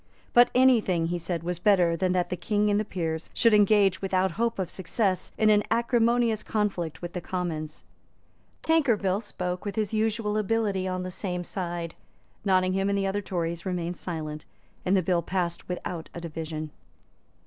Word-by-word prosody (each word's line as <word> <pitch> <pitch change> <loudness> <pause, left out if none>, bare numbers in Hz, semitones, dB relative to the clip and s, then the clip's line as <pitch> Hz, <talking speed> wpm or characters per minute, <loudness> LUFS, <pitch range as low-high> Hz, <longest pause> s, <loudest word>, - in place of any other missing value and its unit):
But 240 0 +7
any 255 -2 +6
thing, 170 -4 0
he 175 0 -1
said, 170 -1 -3
was 175 0 -3
better 180 -4 +4
than 185 +1 0
that 180 -1 0
the 180 - -1
King 210 +3 +1
and 205 - +3
the - - +1
Peers 165 -5 -3
should 230 -2 +4
engage, 205 -3 +4
without 190 -1 +1
hope 230 +6 -1
of 185 -3 -3
success, 190 0 -1
in 215 -1 +4
an 210 0 +5
acrimonious 235 -1 +2
conflict 190 -7 -2
with 175 - -5
the 180 - -4
Commons. 160 -4 -4 0.8
Tankerville 225 - +2
spoke 180 -4 -4
with 205 - -4
his 215 -1 -1
usual 215 -1 0
ability 210 -3 0
on 185 0 -2
the 185 - -5
same 180 -1 -3
side. 175 -2 -4 0.5
Nottingham 190 0 +2
and 200 - +1
the 195 - 0
other 195 +1 -1
Tories 170 -3 -3
remained 180 -2 -2
silent; 155 -4 -5 0.4
and 190 +2 +4
the 185 - +1
bill 175 0 +2
passed 175 0 -3
without 180 -2 -5
a 170 - -5
division. 155 -2 -5
185 Hz, 175 wpm, -27 LUFS, 175-210 Hz, 0.8 s, But